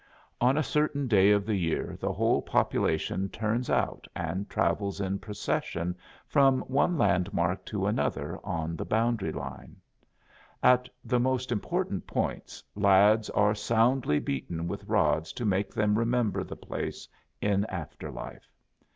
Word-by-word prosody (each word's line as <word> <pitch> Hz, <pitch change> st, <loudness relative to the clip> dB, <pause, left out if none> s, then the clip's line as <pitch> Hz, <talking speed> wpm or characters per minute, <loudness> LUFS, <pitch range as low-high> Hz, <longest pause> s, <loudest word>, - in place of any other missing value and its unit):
On 130 Hz, +4 st, +4 dB
a 155 Hz, -, +2 dB
certain 145 Hz, -1 st, 0 dB
day 100 Hz, -4 st, +5 dB
of 100 Hz, -1 st, +3 dB
the 110 Hz, -, 0 dB
year 85 Hz, -5 st, -1 dB
the -, -, -1 dB
whole -, -, +2 dB
population 95 Hz, +4 st, 0 dB
turns 110 Hz, +4 st, -2 dB
out 65 Hz, -4 st, 0 dB
and 95 Hz, +2 st, -3 dB
travels 100 Hz, -1 st, 0 dB
in 95 Hz, 0 st, -1 dB
procession 90 Hz, -4 st, -2 dB, 0.3 s
from 135 Hz, -3 st, +4 dB
one 145 Hz, +6 st, +1 dB
landmark 90 Hz, -, +1 dB
to 100 Hz, -3 st, -2 dB
another 85 Hz, -5 st, -1 dB
on 85 Hz, -4 st, -3 dB
the -, -, -4 dB
boundary 115 Hz, -1 st, 0 dB
line. -, -, -7 dB, 0.9 s
At 125 Hz, 0 st, +5 dB, 0.2 s
the 125 Hz, +1 st, +1 dB
most 130 Hz, 0 st, 0 dB
important 105 Hz, -, -2 dB
points -, -, -3 dB
lads 105 Hz, +2 st, +4 dB
are 105 Hz, 0 st, +3 dB
soundly 115 Hz, -, +2 dB
beaten 80 Hz, +5 st, -3 dB
with -, -, -5 dB
rods 80 Hz, +1 st, +2 dB
to 120 Hz, -, -4 dB
make 100 Hz, -1 st, 0 dB
them 105 Hz, 0 st, +1 dB
remember 115 Hz, -2 st, +1 dB
the -, -, -8 dB
place -, -, -5 dB, 0.3 s
in 100 Hz, -1 st, +1 dB
after 85 Hz, -8 st, -6 dB
life. -, -, -9 dB
105 Hz, 140 wpm, -28 LUFS, 95-120 Hz, 0.9 s, day